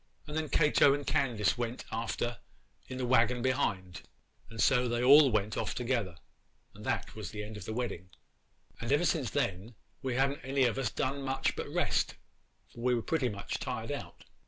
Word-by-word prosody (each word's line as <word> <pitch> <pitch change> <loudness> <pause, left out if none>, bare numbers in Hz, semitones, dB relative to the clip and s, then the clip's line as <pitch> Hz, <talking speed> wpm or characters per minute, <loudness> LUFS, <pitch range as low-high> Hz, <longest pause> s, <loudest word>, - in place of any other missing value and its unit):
'And 150 0 -7
then 155 -1 -1
Cato 150 -2 +5
and 145 -1 -5
Candace 120 -7 +1
went 120 +1 -3
after 115 0 -2 0.5
in 130 - -6
the 130 - -1
waggon 120 0 +3
behind, 100 -9 -1 0.5
and 115 -1 -10
so 125 0 +4
they 120 0 0
all 140 +2 +8
went 110 -2 0
off - - -2
together, 120 -8 -1 0.6
and - - -12
that - - -2
was - - -6
the 105 -1 -5
end 105 +1 -8
of 105 -4 -8
the 110 - -4
wedding. 105 -7 -4 0.7
And 120 +2 -3
ever 145 +5 +3
since 145 -9 +1
then 100 +4 -2 0.3
we 130 -2 -2
ha'n't 135 +2 +1
any 135 0 +1
of 120 +1 +1
us 130 -4 0
done 135 +4 -2
much 135 0 -1
but - - -5
rest, - - 0 0.6
for 115 - -10
we 125 0 +2
were 115 - -2
pretty 150 -6 0
much 100 -2 -4
tired - - -4
out. - - -7
125 Hz, 190 wpm, -31 LUFS, 110-135 Hz, 0.7 s, all